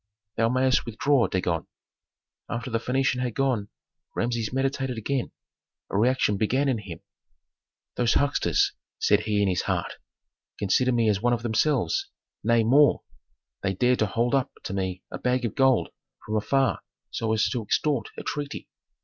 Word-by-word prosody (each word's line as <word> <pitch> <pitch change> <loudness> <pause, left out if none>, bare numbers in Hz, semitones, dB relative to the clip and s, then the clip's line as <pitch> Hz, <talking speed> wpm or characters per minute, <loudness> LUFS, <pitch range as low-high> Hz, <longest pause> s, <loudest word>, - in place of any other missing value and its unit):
Thou 115 0 +2
mayst 130 +1 +2
withdraw, 120 +1 +2
Dagon." 90 -4 -1 0.8
After 120 +1 -4
the 115 - +1
Phœnician 130 +1 0
had 125 -3 -2
gone, 125 -7 0 0.5
Rameses 115 -2 -1
meditated 135 -1 -1
again; 130 +3 -2 0.6
a - - -3
reaction 115 -1 +2
began 130 +7 +1
in 130 -5 +1
him, 95 -6 -9 1.0
"Those 120 -2 +2
hucksters," 140 0 +2 0.2
said 105 - +3
he 105 -1 0
in - - +2
his 90 -2 +1
heart, - - -2 0.6
"consider 125 +6 +2
me 115 -2 +2
as 100 -2 +1
one 120 +1 +2
of 120 -1 -2
themselves, 150 - +1 0.3
nay 115 +1 +3
more, 140 +6 +4 0.6
they 100 -1 -1
dare 125 +6 +3
to 110 - +1
hold 120 +4 0
up 135 -1 +1
to - - -5
me 95 -1 -3
a - - -5
bag 125 0 0
of 110 - -2
gold 135 -2 +3 0.4
from 110 - -3
afar 135 +5 +1 0.3
so 110 -1 -2
as 110 -1 +2
to 125 - -1
extort 120 +2 0
a - - -6
treaty! 145 -1 -4
120 Hz, 160 wpm, -26 LUFS, 110-130 Hz, 1.0 s, more